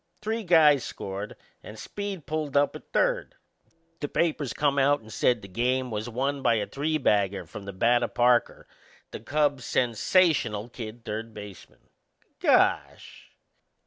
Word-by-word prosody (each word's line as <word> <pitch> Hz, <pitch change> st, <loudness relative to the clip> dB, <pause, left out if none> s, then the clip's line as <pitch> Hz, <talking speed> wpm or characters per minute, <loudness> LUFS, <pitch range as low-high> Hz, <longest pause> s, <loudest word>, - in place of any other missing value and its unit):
Three 220 Hz, +2 st, -2 dB
guys 155 Hz, -, +5 dB
scored 100 Hz, +2 st, -6 dB, 0.3 s
and 110 Hz, -, -11 dB
Speed 200 Hz, -, -6 dB
pulled 150 Hz, -1 st, -2 dB
up 145 Hz, 0 st, +2 dB
at -, -, -12 dB
third. -, -, 0 dB, 0.6 s
The 145 Hz, -, -3 dB
papers 150 Hz, -4 st, -1 dB
come 145 Hz, -1 st, +1 dB
out 145 Hz, +2 st, +3 dB
and 110 Hz, 0 st, -13 dB
said 120 Hz, -4 st, +1 dB
the -, -, -8 dB
game 125 Hz, +5 st, -1 dB
was 110 Hz, +2 st, -4 dB
won 135 Hz, +4 st, -2 dB
by 120 Hz, -3 st, +3 dB
a 105 Hz, -2 st, -1 dB
three 155 Hz, +6 st, -2 dB
bagger 100 Hz, -, +1 dB
from 100 Hz, +5 st, -10 dB
the 100 Hz, -, -5 dB
bat 120 Hz, +6 st, +2 dB
o' -, -, 0 dB
Parker, 120 Hz, 0 st, +1 dB, 0.4 s
the -, -, -7 dB
Cubs' 140 Hz, +3 st, 0 dB
sensational 120 Hz, -, +1 dB
kid 115 Hz, -1 st, -9 dB
third 110 Hz, +1 st, -5 dB
baseman. 105 Hz, -2 st, -12 dB, 0.5 s
Gosh! -, -, +1 dB
125 Hz, 150 wpm, -26 LUFS, 110-150 Hz, 0.6 s, guys